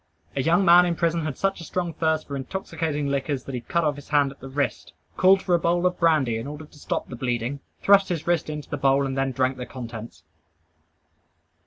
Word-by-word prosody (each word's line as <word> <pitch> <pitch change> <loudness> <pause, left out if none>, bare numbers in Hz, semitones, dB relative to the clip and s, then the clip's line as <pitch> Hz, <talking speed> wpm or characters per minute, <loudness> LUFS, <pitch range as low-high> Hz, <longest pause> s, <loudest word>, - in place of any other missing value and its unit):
A 135 - +1
young 170 +7 +3
man 175 +1 +7
in 170 - 0
prison 165 -1 0
had 155 -4 -4
such 195 -2 -1
a - - -7
strong 175 +1 -3
thirst 160 0 0
for 140 - -5
intoxicating 155 +1 -3
liquors, 140 -1 -1
that 135 - -8
he 125 - -3
cut 170 +7 -1
off 150 -2 0
his 145 - -12
hand 145 -2 +3
at 135 - -16
the 135 - -9
wrist, 140 -1 -2 0.2
called 190 +1 +5
for 180 - 0
a 170 - +4
bowl 175 +2 +1
of 180 0 +1
brandy 150 -9 +2
in 115 - -6
order 150 +2 -7
to 150 0 -18
stop - - -3
the 125 - -6
bleeding, 120 +2 -2 0.2
thrust 200 0 +5
his 165 -3 -2
wrist 170 -2 0
into 150 -1 -5
the 145 - -4
bowl, 140 0 +3
and 135 -1 -3
then 135 0 0
drank 130 +1 0
the 125 - -5
contents. 115 -8 -8
150 Hz, 230 wpm, -24 LUFS, 135-170 Hz, 0.2 s, man